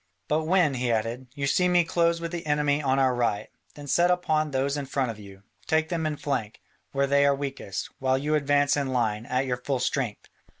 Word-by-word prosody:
"But 155 +1 0
when," 175 -4 +3
he 125 -2 -1
added, 115 +3 -2
"you 140 -1 -2
see 180 +6 +2
me 175 -1 +4
close 170 0 +1
with 170 0 -5
the 170 -3 -5
enemy 145 0 +1
on 135 -2 +1
our 130 -2 +3
right, 120 -4 -1 0.3
then 145 - -9
set 170 +5 +3
upon 155 -4 +1
those 140 +1 0
in 145 -2 -4
front 130 -3 -1
of 110 - -11
you: 100 -1 -13 0.2
take 160 0 +1
them 165 -2 -1
in 150 -1 -3
flank, 115 -8 -3 0.3
where 140 0 +1
they 140 +1 +3
are 140 0 +4
weakest, 135 -8 -5
while 130 0 +2
you 150 +3 -1
advance 145 -1 +3
in 140 -2 -1
line, 115 -3 -1
at 130 +1 0
your 125 -1 -1
full 130 +2 -2
strength. 125 -3 -2
140 Hz, 220 wpm, -26 LUFS, 125-155 Hz, 0.3 s, me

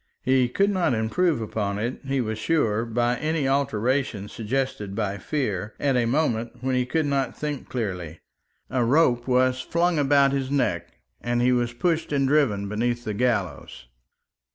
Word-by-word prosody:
He 130 -1 +3
could 200 +10 +2
not 180 -10 +1
improve 135 +8 +1
upon 105 -2 -2
it, 120 +5 -3
he 135 -1 0
was 110 -2 -3
sure, 115 -6 +1
by 120 +1 0
any 155 -1 -1
alteration 130 -5 0
suggested 110 -3 -3
by 100 -2 -2
fear, 105 - -2
at 140 -2 +1
a 120 -2 +2
moment 120 -4 0
when 130 0 -1
he 125 -1 +1
could 160 +3 0
not 140 -3 -1
think 150 -2 -4
clearly. 90 -9 -4 0.5
A 125 -2 +1
rope 120 -2 +3
was 130 0 +2
flung 170 +1 +1
about 140 -1 +4
his 135 -1 -1
neck, 140 -1 0 0.3
and 120 0 0
he 125 +1 +3
was 120 -1 +1
pushed 165 +5 0
and 140 -2 +2
driven 130 -9 +2
beneath 120 +3 -1
the 105 - -2
gallows. 115 - -2
125 Hz, 165 wpm, -25 LUFS, 110-140 Hz, 0.5 s, about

